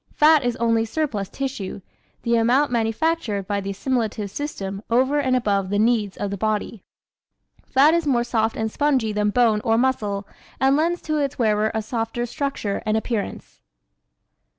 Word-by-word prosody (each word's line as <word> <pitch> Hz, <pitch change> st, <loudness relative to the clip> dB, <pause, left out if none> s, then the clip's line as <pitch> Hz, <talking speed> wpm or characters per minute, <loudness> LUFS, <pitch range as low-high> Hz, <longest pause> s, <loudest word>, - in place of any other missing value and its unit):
Fat 305 Hz, -1 st, +5 dB
is 245 Hz, -1 st, 0 dB
only 230 Hz, -1 st, +2 dB
surplus 225 Hz, -5 st, -2 dB
tissue 260 Hz, -9 st, -4 dB, 0.4 s
the 235 Hz, -1 st, +2 dB
amount 245 Hz, +5 st, +3 dB
manufactured 230 Hz, -, 0 dB
by 200 Hz, 0 st, -1 dB
the 195 Hz, -, -5 dB
assimilative 215 Hz, -1 st, -2 dB
system 200 Hz, -9 st, -5 dB
over 260 Hz, +5 st, +2 dB
and 260 Hz, -3 st, +1 dB
above 200 Hz, -6 st, 0 dB
the 205 Hz, -, 0 dB
needs 215 Hz, -2 st, +1 dB
of 200 Hz, -, -3 dB
the 200 Hz, -, -3 dB
body. 215 Hz, 0 st, -2 dB, 0.9 s
Fat 285 Hz, +4 st, +5 dB
is 335 Hz, -2 st, +1 dB
more 240 Hz, -4 st, +2 dB
soft 225 Hz, -2 st, 0 dB
and 220 Hz, 0 st, -2 dB
spongy 265 Hz, -7 st, +1 dB
than 210 Hz, 0 st, +1 dB
bone 220 Hz, -1 st, +3 dB
or 225 Hz, 0 st, +2 dB
muscle 215 Hz, -6 st, 0 dB, 0.3 s
and 270 Hz, +1 st, +4 dB
lends 335 Hz, +4 st, 0 dB
to 310 Hz, -1 st, -1 dB
its 285 Hz, -1 st, -1 dB
wearer 215 Hz, -3 st, +2 dB
a 220 Hz, -, -1 dB
softer 225 Hz, +1 st, -2 dB
structure 245 Hz, -5 st, -3 dB
and 215 Hz, 0 st, +1 dB
appearance. 220 Hz, -2 st, -4 dB
230 Hz, 165 wpm, -23 LUFS, 210-270 Hz, 0.9 s, Fat